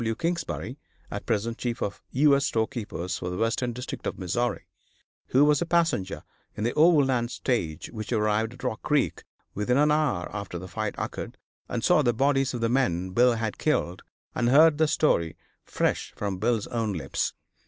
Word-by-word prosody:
W. 115 0 -1
Kingsbury, 165 -5 -3 0.3
at 100 - -6
present 115 +1 -1
chief 120 -2 -2
of 100 - -3
U. 140 +2 +4
S. 140 0 +1
Storekeepers 110 -5 -2
for 90 - -4
the 90 - -4
western 115 +2 0
district 125 +2 -6
of - - -3
Missouri, 110 +3 -1 0.6
who 135 +3 +4
was 150 +1 +3
a - - +1
passenger 165 - 0 0.3
in 105 - -2
the 120 - 0
overland 140 -7 +4
stage 85 - -2
which 110 -1 -6
arrived 110 0 +1
at 125 - -14
Rock 125 -3 -2
Creek 145 -3 0 0.3
within 115 +5 +1
an 150 +1 +4
hour 150 - +1
after 100 -4 -5
the 90 +2 -7
fight 105 +3 -3
occurred, - - -5 0.3
and 120 - -3
saw 180 -3 +5
the 120 -4 +2
bodies 135 +1 +1
of 120 - -4
the 115 - +2
men 95 -8 0
Bill 120 +5 +4
had 110 -2 -3
killed, 95 - 0 0.3
and 120 - +1
heard 150 +3 +6
the 160 - +4
story 85 - +1 0.3
fresh - - -1
from 100 -3 -3
Bill's 115 0 +1
own 115 -3 -2
lips. 85 - -2
120 Hz, 185 wpm, -26 LUFS, 105-140 Hz, 0.6 s, heard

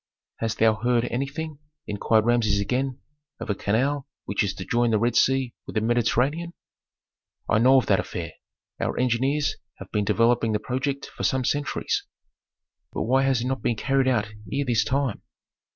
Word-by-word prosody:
"Hast 115 -1 -2
thou 110 0 +5
heard 120 +1 +1
anything," 140 +4 -3 0.3
inquired 110 +1 +1
Rameses 115 -4 +2
again, 130 +5 -1 0.4
"of 110 - -3
a - - +2
canal 130 +8 0 0.2
which 100 +4 0
is 100 - 0
to - - -7
join 120 0 +2
the 110 - +3
Red 120 +3 +1
Sea 135 -2 +2
with - - -8
the 110 - +2
Mediterranean?" 125 +9 +1 0.9
"I 105 - +3
know 130 +3 +6
of 130 - +3
that 95 - +3
affair. 85 -2 -4 0.5
Our - - -2
engineers 135 +4 +1 0.2
have - - -11
been 105 - +1
developing 115 +2 +2
the 105 - +1
project 135 +4 -2
for - - -10
some 130 -1 +1
centuries." 145 +2 -1 0.9
"But - - -2
why 130 +3 +3
has 130 -3 +2
it - - -2
not 130 0 -2
been 120 - 0
carried 135 +4 +1
out 115 -5 +2 0.2
ere 140 +1 0
this 115 -4 +2
time?" 135 -3 -1
120 Hz, 175 wpm, -25 LUFS, 110-135 Hz, 0.9 s, know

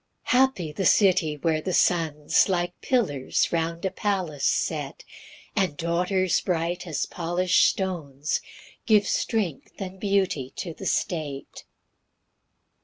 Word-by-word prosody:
1 250 - +5
Happy 195 -13 +1
the 170 +6 -3
city, 175 -7 +3
where 155 +1 0
their 185 - -3
sons 160 -1 +2
Like 175 -1 0
pillars 155 - 0
round 165 +1 -1
a 190 - 0
palace 185 -9 -1
set, - - -1 0.5
And 180 -7 0
daughters 180 +2 +1
bright 175 +1 -2
as 155 - -1
polish'd 175 +1 +1
stones 155 -7 -2 0.5
Give 210 -2 +5
strength 200 - -1
and 190 -1 -6
beauty 190 -10 0
to 170 - -5
the - - -6
state. 150 -6 -3
175 Hz, 120 wpm, -25 LUFS, 155-190 Hz, 0.5 s, 1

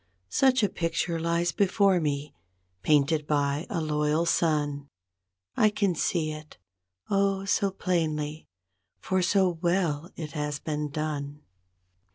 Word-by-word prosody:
Such 260 -3 +3
a - - +5
picture 165 -1 -2
lies 170 +1 0
before 195 -1 +3
me, 145 -2 -2 0.5
painted 150 - +2
by 145 +1 0
a 170 - -1
loyal 150 +1 +1
son; 145 -4 0 0.7
I 215 - +4
can 205 -3 0
see 160 -1 0
it. 155 -5 -10 0.5
Oh, 195 -1 +1
so 200 0 +2
plainly, 160 -5 -2 0.5
for 185 0 -1
so 180 -2 +2
well 170 -3 0
it 155 -3 -6
has 150 -2 -3
been 150 -1 -3
done. 145 -1 -4
160 Hz, 125 wpm, -27 LUFS, 150-185 Hz, 0.7 s, a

